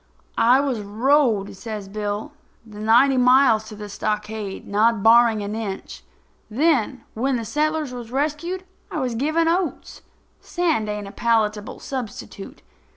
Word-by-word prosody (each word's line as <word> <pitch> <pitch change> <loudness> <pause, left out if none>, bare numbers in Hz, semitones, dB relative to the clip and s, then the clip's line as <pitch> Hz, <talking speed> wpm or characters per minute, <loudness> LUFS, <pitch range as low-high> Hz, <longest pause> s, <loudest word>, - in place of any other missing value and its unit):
"I 245 +3 +5
was 270 -5 -1
rode," 220 0 +1
says 210 -1 -7
Bill, 210 +5 -4 0.3
"the 210 -2 -12
ninety 240 +5 +4
miles 250 -3 +5
to 215 - -10
the 210 0 -8
stockade, 210 -1 -4
not 215 +1 +2
barring 225 -2 +5
an 205 +1 -4
inch. 215 -3 -6 0.5
Then, 260 -1 +1
when 260 +4 0
the 230 -2 -3
settlers 305 +1 -1
was 240 -2 -8
rescued, 310 +7 -2 0.3
I 315 - -3
was 255 -3 -1
given 310 +7 +1
oats. 345 +1 -2 0.4
Sand 320 -12 -1
ain't 210 -1 -4
a - - -9
palatable 215 -2 0
substitute. 225 -6 -7
230 Hz, 140 wpm, -22 LUFS, 210-275 Hz, 0.5 s, I